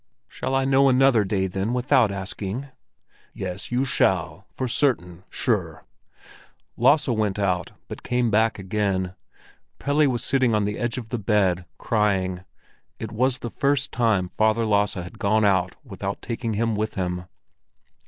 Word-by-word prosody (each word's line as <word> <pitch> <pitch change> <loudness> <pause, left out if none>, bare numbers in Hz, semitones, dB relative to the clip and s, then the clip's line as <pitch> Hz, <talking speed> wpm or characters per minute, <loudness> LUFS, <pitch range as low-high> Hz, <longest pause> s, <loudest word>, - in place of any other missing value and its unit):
"Shall 135 - -3
I 135 0 +2
know 135 0 +4
another 130 -3 +4
day, 95 -1 0
then, 95 +5 -2
without 125 -3 +3
asking?" 100 +6 -5 0.7
"Yes, 95 +3 -5
you 125 +2 +1
shall, 130 - +1
for 130 - -3
certain—sure!" 90 - -1 0.9
Lasse 150 0 +4
went 110 -5 0
out, 95 -4 -1
but - - -8
came 125 -2 0
back 110 +1 +2
again. 95 -2 -1 0.6
Pelle 145 +1 +2
was 120 -2 -1
sitting 130 -4 +2
on 105 -1 +1
the 105 +1 -3
edge 120 0 -1
of 115 -3 -6
the 120 - -2
bed, 95 -4 +1
crying; 95 -4 0 0.5
it 110 -2 -6
was 125 +3 +1
the 120 - -6
first 140 0 0
time 110 -6 +1
Father 110 +4 +1
Lasse 105 -1 +2
had 90 -1 -7
gone 110 +1 +2
out 95 -2 +2
without 100 -5 -5
taking 115 -2 -3
him 115 +1 0
with 110 +1 -2
him. 90 -1 -2
110 Hz, 150 wpm, -24 LUFS, 95-125 Hz, 0.9 s, know